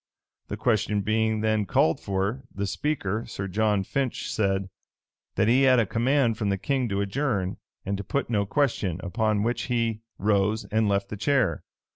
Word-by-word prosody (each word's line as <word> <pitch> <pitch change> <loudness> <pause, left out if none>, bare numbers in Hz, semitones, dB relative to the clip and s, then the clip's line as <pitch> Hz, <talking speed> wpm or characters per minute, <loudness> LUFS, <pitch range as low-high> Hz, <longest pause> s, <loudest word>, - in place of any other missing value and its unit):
The - - -5
question 105 -3 +1
being 110 +1 +1
then 110 -2 +1
called 80 0 +2
for, 100 +6 -2
the 100 - -3
speaker, 110 -2 -2
Sir 100 -3 -5
John 105 +1 +1
Finch, 135 +4 -2
said, 95 -2 0 0.7
"That - - +2
he 125 +4 +4
had 130 -2 +5
a 115 - +3
command 120 +1 +1
from 105 - 0
the 100 - +1
king 130 +3 -1
to 100 0 0
adjourn, 100 -3 -1 0.3
and 100 - -1
to 100 - -5
put 140 +7 -2
no 100 -4 0
question;"[*] 105 - 0
upon 105 +1 0
which 120 +2 -1
he 115 -2 0 0.2
rose 105 +1 +1
and 110 -1 +2
left 100 0 0
the 105 - -5
chair. 120 - +1
110 Hz, 175 wpm, -26 LUFS, 100-120 Hz, 0.7 s, had